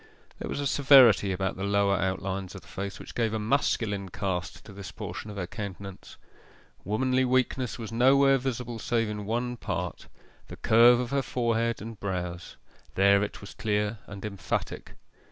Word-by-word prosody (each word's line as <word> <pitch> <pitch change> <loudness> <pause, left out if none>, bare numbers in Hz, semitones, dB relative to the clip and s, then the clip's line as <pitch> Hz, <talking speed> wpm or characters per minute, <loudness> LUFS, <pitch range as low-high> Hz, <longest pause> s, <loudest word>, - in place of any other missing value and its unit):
There - - -5
was - - -3
a 145 - -2
severity 130 -8 +6
about 95 0 -2
the 95 - -4
lower 100 0 +2
outlines 95 0 -2
of 95 - -8
the - - -20
face 100 +1 -5
which - - -10
gave 110 -2 0
a - - -1
masculine 105 -4 0
cast 90 -1 -4
to 105 - -11
this 95 -1 -8
portion 105 0 -7
of 105 - -8
her 90 - -2
countenance. 100 0 -8 0.7
Womanly 130 +5 +1
weakness 130 0 0
was 115 -2 -7
nowhere 135 +3 +5
visible 120 -2 -4
save 115 -1 0
in 105 -1 -5
one 120 +2 -2
part - - -4 0.4
the - - -9
curve 120 +2 +6
of 125 0 -3
her 140 0 +2
forehead 115 -3 -1
and 110 -1 -8
brows 90 -3 -4 0.4
there 100 +1 +5
it 105 - -4
was 100 - -10
clear 105 -2 -1
and 105 0 -8
emphatic. 100 -2 -4
105 Hz, 170 wpm, -28 LUFS, 100-120 Hz, 0.7 s, severity